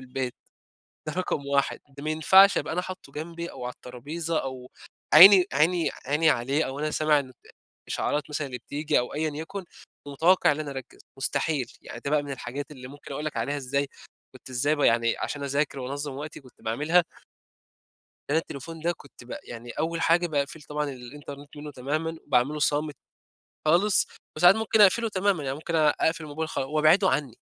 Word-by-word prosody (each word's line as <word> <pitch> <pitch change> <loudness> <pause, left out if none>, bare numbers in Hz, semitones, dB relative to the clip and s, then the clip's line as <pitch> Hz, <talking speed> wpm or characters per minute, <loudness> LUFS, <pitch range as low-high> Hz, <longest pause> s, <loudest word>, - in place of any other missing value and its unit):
البيت، 130 -1 -4 0.7
ده 155 - -3
رقم 175 -6 -2
1 140 0 +1
ده 140 +1 -12
ما 155 - -1
ينفعش 190 +6 +6
أبقى - - -3
أنا 180 - 0
حاطه 185 -7 -9
جنبي 170 +2 -6
أو 125 - -8
على 125 - -4
الطرابيزة 155 +7 -4
أو 130 -1 -7 0.4
عيني 185 +2 +10
عيني 165 +4 +2 0.2
عيني 150 +3 +3
عليه، 135 +5 +1
أو 135 +2 -6
أنا 155 +1 -1
سامع 155 -1 +3
إن 130 -2 -5
ت - - -28 0.4
إشعارات 150 +1 -2
مثلًا 145 -1 -2
اللي 125 -2 -6
بتيجي 145 +5 -1
أو 125 - -3
أيًا 155 +1 -1
يكن، 185 +5 -6 0.4
ومتوقع 160 +4 +3
إن 155 - -4
أنا 145 -2 -4
أركّز، 135 -1 -8 0.2
مستحيل، 135 -2 -1
يعني - - -9
ده 140 - -2
بقى 150 -1 +2
من 145 - -8
الحاجات 135 +2 -6
اللي 130 -3 -10
ممكن 145 0 -11
أقول 150 +3 -4
لك 150 -5 -4
عليها 140 +6 -1
إزاي 140 +1 -1 0.5
كنت 130 - -14
إزاي 145 +5 +1
ب - - -4
يعني 115 -2 +3
عشان 145 -1 -4
أذاكر 140 0 -1
وأنظّم 140 +2 -4
وقتي 150 +2 -7
كنت 130 -2 -20
باعملها 150 +10 +2 1.3
أنا 155 - +2
التليفون 165 +1 -5
ده 170 +2 0
كنت 140 - -15
ب 125 - -7
يعني 120 0 -9
أوّل 165 +1 -2
حاجة 170 +1 +3
باقفِل 150 0 -2
طبعًا 150 0 -3
الإنترنت 140 +3 -10
منُّه 150 0 -7
تمامًا، 155 +5 -3
باعمله 140 +3 +2
صامت 150 0 0 0.7
خالص 185 +6 +4 0.3
وساعات 175 +5 +7
ممكن 220 -1 +2
أقفِله 225 +3 +5
تمامًا، 190 -5 0
يعني 135 0 -2
ممكن 165 +2 -4
أ 155 -2 +5
أقفِل 160 +1 0
الموبايل 155 +1 -4
خال - - -2
وأبعده 155 +7 +4
عنّي، 130 -4 -1
150 Hz, 185 wpm, -26 LUFS, 135-160 Hz, 1.3 s, عيني